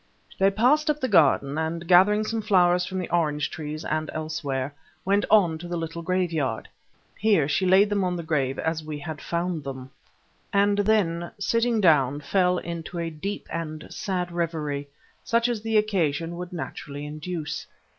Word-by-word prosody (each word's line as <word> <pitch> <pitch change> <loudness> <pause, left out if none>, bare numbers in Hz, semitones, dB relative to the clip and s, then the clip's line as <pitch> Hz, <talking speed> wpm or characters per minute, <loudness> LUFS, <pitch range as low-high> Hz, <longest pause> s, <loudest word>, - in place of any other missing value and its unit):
They 195 0 +5
passed 255 +10 +3
up 300 0 +1
the 260 - 0
garden, 150 - +3
and 165 +1 -3
gathering 195 +4 +5
some 225 +1 -2
flowers 180 -4 +3
from 190 - -4
the 185 - -3
orange 150 -4 0
trees 155 0 -6
and 155 0 -1
elsewhere, 150 -4 -3 0.3
went 200 +2 +2
on 180 -7 +4
to 175 - -7
the 175 0 -3
little 165 0 -4
graveyard. 165 -9 -1 0.5
Here 200 -9 +3
she 185 +5 +1
laid 190 +3 +6
them 200 -1 +1
on 180 -1 0
the 170 - -4
grave 135 -4 0
as 160 -1 -2
we 155 -1 -5
had 150 0 -7
found 170 -2 -2
them, 130 -1 -7 0.6
and 200 0 +3
then 185 -5 +1
sitting 230 0 +1
down, 145 -7 +4
fell 180 +4 +2
into 170 +1 -6
a 165 -1 -2
deep 190 +7 -5
and 155 -2 -5
sad 180 -3 -3
reverie, 155 -4 -2 0.4
such 230 +1 +2
as 235 -3 -2
the 220 0 +1
occasion 170 -6 0
would 180 0 -6
naturally 145 -4 -6
induce. 155 +1 -5
170 Hz, 170 wpm, -25 LUFS, 155-195 Hz, 0.6 s, laid